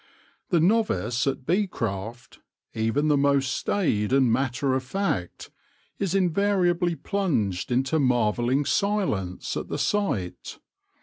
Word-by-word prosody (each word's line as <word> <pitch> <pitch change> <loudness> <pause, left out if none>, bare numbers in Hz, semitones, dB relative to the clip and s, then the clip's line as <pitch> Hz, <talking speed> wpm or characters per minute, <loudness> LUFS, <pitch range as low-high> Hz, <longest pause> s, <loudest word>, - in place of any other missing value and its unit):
The 175 - +3
novice 165 - +1
at 135 -1 -2
bee 195 +6 +1
craft, 115 - -5 0.3
even 115 +7 0
the 150 - +4
most 140 -1 +2
staid 110 - 0
and 130 -4 +4
matter 130 +1 0
of 130 - 0
fact, 130 - -3 0.5
is 195 -1 -1
invariably 180 -2 +2
plunged 135 - -1
into 130 +5 +1
marvelling 125 +1 +1
silence 185 - -1
at - - -4
the - - -3
sight. 100 - -2
135 Hz, 120 wpm, -25 LUFS, 115-185 Hz, 0.5 s, the